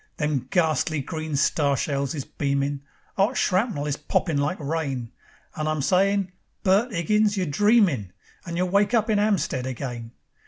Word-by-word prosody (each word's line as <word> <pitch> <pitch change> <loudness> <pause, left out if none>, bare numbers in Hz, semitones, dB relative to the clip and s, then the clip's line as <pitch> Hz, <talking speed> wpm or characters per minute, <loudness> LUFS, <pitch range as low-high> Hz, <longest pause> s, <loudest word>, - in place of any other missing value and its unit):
Them 145 -4 -1
gharstly 160 -2 +1
green 155 -1 -4
star 140 -1 +2
shells 140 +1 -1
is 140 - -4
beamin', 140 0 -1 0.4
'Ot 220 +6 +2
shrapnel 185 - +1
is 145 -1 -2
poppin' 150 +1 0
like 145 +6 -1
rain, 140 -6 -3 0.4
And 155 0 -2
I'm 155 -2 -1
sayin': 195 +2 +2 0.3
"Bert 200 +6 +3
'Iggins, 210 +3 +1
you're 185 - 0
dreamin', 175 - +2 0.3
And 170 -1 -5
you'll 180 +1 0
wake 200 +5 +3
up 220 -1 +2
in 210 - +2
'Ampstead 190 -11 0
again. 120 -2 -5
155 Hz, 155 wpm, -24 LUFS, 140-195 Hz, 0.4 s, Bert